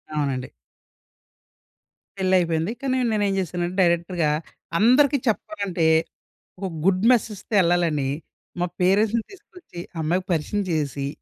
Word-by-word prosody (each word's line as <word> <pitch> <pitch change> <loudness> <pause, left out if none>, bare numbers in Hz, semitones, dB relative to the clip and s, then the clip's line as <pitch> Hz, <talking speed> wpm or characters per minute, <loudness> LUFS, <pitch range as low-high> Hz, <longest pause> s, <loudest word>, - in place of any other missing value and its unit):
అవునండి. 135 -3 -2 1.7
పెళ్ళైయిపోయింది. 180 -2 +1
కానీ 260 -1 0
నేనేం 205 -2 +1
జేశానంటే 175 0 -3
డైరెక్టరుగా 170 -2 +1 0.5
అందరికి 265 +5 +5
చెప్పడం 315 +8 -1
కంటే 170 -3 0 0.7
ఒక 195 - -3 0.2
గుడ్ 190 0 +3
మెసెజ్‌తో 225 -3 -1
యెళ్ళాలని 170 -6 +2 0.5
మా - - +2 0.2
పేరెంట్స్‌ని 210 +5 +3
తీసుకొచ్చి 360 - -13 0.2
అమ్మాయికి 180 +4 0
పరిచయం 175 +5 0
జేసేసి 145 -4 -1
180 Hz, 100 wpm, -23 LUFS, 165-210 Hz, 1.7 s, అందరికి